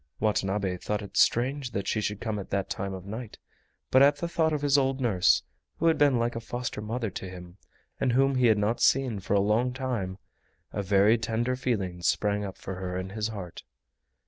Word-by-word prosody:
Watanabe 100 -3 0
thought 105 +3 -3
it 100 - -11
strange 130 +1 +2
that 100 -1 -3
she 110 - 0
should 105 -1 -2
come 110 -2 -3
at 95 - -8
that 100 -1 -2
time 95 -1 -3
of 95 -1 -9
night, 110 +2 -7 0.5
but 130 - +6
at 140 +1 +6
the 155 +4 -3
thought 165 -2 +1
of 150 -1 -2
his 145 -1 +3
old 135 -1 +2
nurse, 95 -8 +3 0.3
who 165 - -2
had 160 -2 +4
been 145 -4 +4
like 120 0 0
a - - -2
foster 120 -1 -5
mother 115 0 -3
to 95 0 -6
him 90 0 -11 0.4
and 130 -3 +1
whom 135 +2 +3
he 130 -2 +3
had 110 -2 +4
not 105 +3 0
seen 130 -6 +3
for 95 +1 -1
a - - +5
long 110 +5 +1
time, 120 -8 -3 0.6
a - - -1
very 100 +3 +4
tender 115 +3 -1
feeling 100 -9 -2
sprang 105 +3 +1
up 95 -2 -6
for 95 -1 -6
her 90 -1 -4
in 95 +1 -4
his 105 +1 -2
heart. 100 -6 -7
110 Hz, 215 wpm, -28 LUFS, 95-125 Hz, 0.6 s, but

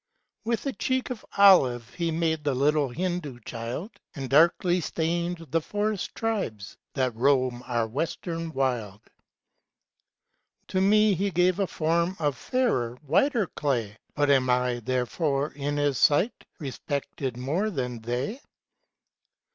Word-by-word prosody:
With 230 +3 -1
a 275 - -1
cheek 260 0 -1
of 245 - -6
olive 130 - +5
He 170 -1 -1
made 160 -1 0
The 145 -2 0
little 145 +1 +2
Hindoo 165 -3 -3
child; 120 - -5 0.2
And 135 -3 -5
darkly 175 +4 +4
stained 170 +1 -2
the 165 +1 +2
forest 205 +3 -2
tribes, 190 - -3 0.2
That 130 -4 0
roam 130 -1 +2
our 120 -2 0
Western 165 +6 -3
wild. 120 -8 -1 1.7
To 185 0 +1
me 210 +1 +5
He 195 +3 0
gave 180 +1 +2
a 195 - +1
form 170 +3 0
Of 145 -4 0
fidrer, 125 - 0
whiter 215 - +2
clay; 120 - -2 0.2
Bnt 145 0 +2
am 130 -2 +4
I, 125 -1 +1
therefore, 135 +4 -1
in 145 +1 -3
his 145 -2 +1
sight, 175 +11 +3
Respected 140 -3 -4
more 155 +12 -1
than 125 - -4
they 125 - -3
150 Hz, 130 wpm, -27 LUFS, 125-180 Hz, 1.7 s, olive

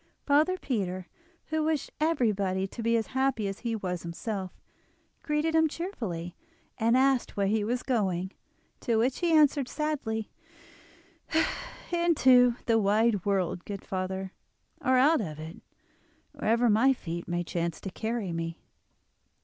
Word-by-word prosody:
Father 305 +6 +3
Peter, 185 - -2 0.4
who 315 0 0
wished 310 -2 -1
everybody 210 - +1
to 215 +5 -7
be 230 +1 +2
as 225 - -1
happy 265 -5 +1
as 195 0 -5
he 235 -2 -2
was 180 -5 -3
himself, 185 +3 -4 0.7
greeted 300 +1 0
him 320 0 +4
cheerfully, 220 - -5 0.4
and 230 +3 +3
asked 265 -4 +2
where 200 - +2
he 210 +2 +1
was 240 +4 -1
going, 190 -7 0 0.5
to 235 - 0
which 245 +3 +1
he 345 -2 +1
answered 295 -4 +4
sadly: 255 -8 -2 1.6
"Into 260 -8 +5
the 225 -1 +3
wide 210 -1 +2
world, 185 -3 0
good 200 -2 -7
father, 190 0 -3 0.5
or 260 0 +4
out 290 +2 +5
of 155 -7 -5
it, 160 +2 -9 0.7
wherever 235 +2 +1
my 235 +5 +5
feet 170 -7 -6
may 175 0 -1
chance 170 -1 -3
to 195 - -5
carry 220 -2 -3
me." 165 0 -4
225 Hz, 140 wpm, -28 LUFS, 190-265 Hz, 1.6 s, Into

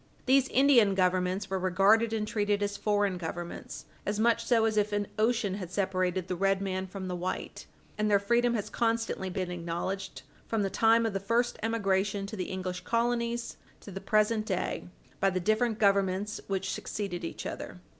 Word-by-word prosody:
These 265 0 +4
Indian 250 -8 +5
Governments 185 +1 +1
were 190 0 -2
regarded 195 +5 +3
and 215 -1 -1
treated 205 -1 0
as 205 0 -2
foreign 205 -3 0
Governments 175 +1 -6 0.2
as 205 +1 -2
much 230 +1 +3
so 230 -1 +3
as 220 -1 +1
if 210 0 +1
an 205 0 0
ocean 225 -3 +2
had 190 -3 -5
separated 185 -1 -1
the 185 - -2
red 195 +1 +2
man 190 -1 -3
from 190 0 -6
the 180 - -3
white, 180 +1 -5 0.3
and 210 0 +2
their 205 - +5
freedom 235 +4 +2
has 210 -2 -2
constantly 225 -3 -1
been 180 -1 -3
acknowledged, 175 +3 -4 0.2
from 225 -2 0
the 195 - -1
time 230 +2 +4
of 225 - -1
the 195 - -1
first 230 +5 0
emigration 200 -3 0
to 205 - -6
the 185 -3 -3
English 185 -1 -4
colonies 235 +1 -1 0.2
to 205 - -10
the 195 +1 -6
present 215 0 +2
day, 185 -2 -2 0.3
by 195 - +3
the 185 -1 -1
different 215 +4 +1
Governments 200 0 +1
which 195 -1 -2
succeeded 190 -4 -4
each 165 - -5
other. - - -6
200 Hz, 185 wpm, -29 LUFS, 185-225 Hz, 0.3 s, Indian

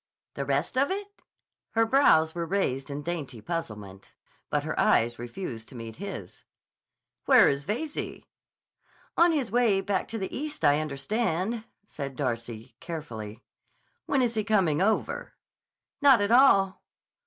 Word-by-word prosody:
"The 140 - -4
rest 140 - 0
of 275 - +2
it?" 405 +1 -5 0.5
Her 225 0 +3
brows 190 - +4
were 170 -1 -3
raised 150 -8 -1
in 145 +1 -5
dainty 145 -8 -4
puzzlement, 105 - -6 0.4
but - - 0
her - - -3
eyes 120 +1 +3
refused 120 -2 -6
to 135 - -13
meet 115 -2 -8
his. 185 - -7 0.8
"Where - - +7
is 140 0 0
Veyze?" 280 - -4 0.9
"On 340 0 +5
his 280 -8 -1
way 230 -5 +3
back 195 -1 -1
to 225 - -5
the 190 -3 -4
East, 300 +2 -3
I 145 +1 +5
understand," 190 +8 -2 0.2
said 140 -8 -6
Darcy 120 -3 -4
carefully. 120 -10 -7 0.6
"When 270 -2 +2
is 235 -2 0
he 215 -2 0
coming 190 -8 +2
over?" 220 +3 -1 0.7
"Not 275 -4 +7
at 205 +1 0
all." 200 -7 +5
170 Hz, 140 wpm, -27 LUFS, 135-225 Hz, 0.9 s, Where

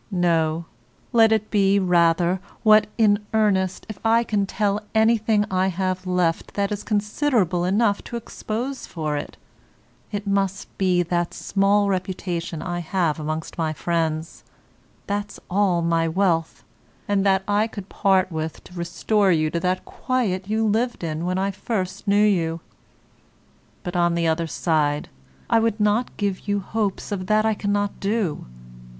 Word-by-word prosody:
No, 170 -3 +1 0.5
let 225 -1 +6
it 215 -1 0
be 200 -1 +3
rather 175 -1 +3 0.2
what, 215 -1 +6
in 210 -2 +3
earnest, 190 -4 +1
if 215 -4 -8
I 230 +1 +4
can 205 -3 0
tell 205 0 0
anything 220 -1 +3
I 185 0 +2
have 185 0 -2
left 180 -2 0
that 200 0 0
is 205 - -2
considerable 210 - +1
enough 200 +2 +2
to - - -6
expose 235 +3 -5
for 155 -3 -3
it, 145 - -5 0.7
it 205 -1 -4
must 195 -1 -1
be 180 -2 +3
that 175 0 -1
small 200 +1 +2
reputation 180 -3 -3
I 175 -1 -3
have 170 -2 -1
amongst 155 +2 -4
my 160 -1 0
friends, 160 -1 -2 0.6
that's 205 +1 -3
all 185 -3 +2
my 165 0 +2
wealth, 165 -2 0 0.4
and 200 -1 +1
that 195 -1 +3
I 205 +2 +2
could 200 -4 -8
part 190 -2 +2
with 160 0 -4
to - - -15
restore 190 +3 +1
you 155 -2 +2
to 170 - -1
that 185 +1 -1
quiet 205 -7 -2
you 220 +1 +1
lived 225 +1 0
in 160 0 -3
when 185 +1 -1
I 195 +1 0
first 195 -1 -4
knew 205 +1 +4
you. 165 -5 +1 1.2
But, 175 - -5
on 175 -1 +2
the 170 0 0
other 165 +1 +1
side, 150 -2 0 0.4
I 230 - +4
would 225 -1 0
not 210 +4 +1
give 200 -1 -2
you 205 0 +1
hopes 210 +1 -3
of 185 -2 -3
that 215 +1 +3
I 220 - +3
cannot 205 -1 -1
do. 200 - -1
190 Hz, 155 wpm, -23 LUFS, 170-210 Hz, 1.2 s, let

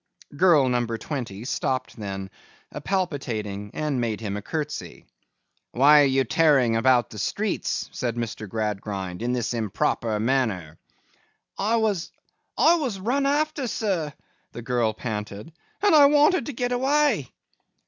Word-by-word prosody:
Girl 160 -5 +5
number 120 -2 0
twenty 115 -5 -5
stopped 130 0 -2
then, 95 -3 -6 0.5
palpitating, 115 - -2
and 150 -5 -1
made 110 -3 -2
him 105 -3 -4
a 105 - -4
curtsey. 150 +5 -5 0.7
'Why 145 +4 +6
are - - +5
you 135 0 +2
tearing 135 -4 +3
about 120 +1 +3
the 105 - -8
streets,' 205 - -2
said 120 -2 -3
Mr. 110 -3 -5
Gradgrind, 100 -3 -4
'in 120 +1 -1
this 125 -1 -1
improper 110 0 -1
manner?' 110 - -1 0.8
'I 215 +4 +1
was—I 220 - 0
was 255 - -3
run 265 +8 0
after, 295 -1 0
sir,' 190 -10 -1 0.4
the 120 - -7
girl 120 -2 +1
panted, 105 +4 -6 0.3
'and 410 - +5
I 290 -2 +8
wanted 300 +5 +3
to 290 - -4
get 245 +1 -2
away. 265 - +1
130 Hz, 135 wpm, -24 LUFS, -, 0.8 s, I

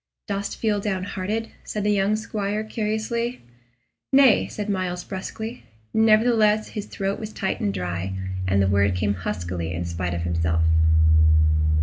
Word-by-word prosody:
"Dost 200 -1 -3
feel 215 -2 +1
downhearted?" 200 +2 -3
said 210 - -4
the 210 - +2
young 200 +1 +2
squire, 215 -1 -2
curiously. 220 +3 -2 0.7
"Nay," 265 -4 +5
said 210 -1 -5
Myles, 185 -3 -2
brusquely. 220 +5 -6 0.3
Nevertheless 220 -1 +4
his 210 -1 -6
throat 195 0 -3
was 215 -1 -6
tight 190 -2 -2
and 100 - 0
dry, 90 0 -3 0.3
and 100 +1 +3
the - - +2
word 100 0 +2
came 100 +2 +1
huskily 85 -2 -4
in 85 +1 -3
spite 85 +1 -3
of 85 - -3
himself. 80 -1 +1
200 Hz, 140 wpm, -24 LUFS, -, 0.7 s, Nay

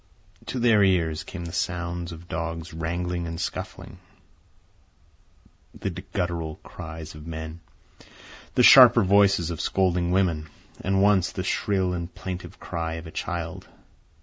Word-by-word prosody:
To - - -3
their 115 -4 +4
ears 85 -5 +2
came 85 -3 -7
the 85 - -6
sounds 85 0 -3
of 85 +1 -10
dogs 85 +1 -4
wrangling 85 +1 -3
and 80 0 -5
scuffling, - - -6 1.8
the - - -3
guttural 85 -3 -3
cries 80 -1 -8
of 75 +1 -11
men, 80 0 -6 1.0
the - - +4
sharper - - +9
voices 100 -3 +4
of 80 - -4
scolding 90 -2 +1
women, 85 -5 +1 0.3
and 95 +1 +2
once 100 -3 +3
the - - -4
shrill 95 -3 0
and 85 0 -4
plaintive 90 -1 -7
cry 80 -1 -4
of 80 +1 -7
a 80 - -9
child. 85 +1 -4
85 Hz, 135 wpm, -25 LUFS, 80-95 Hz, 1.8 s, sharper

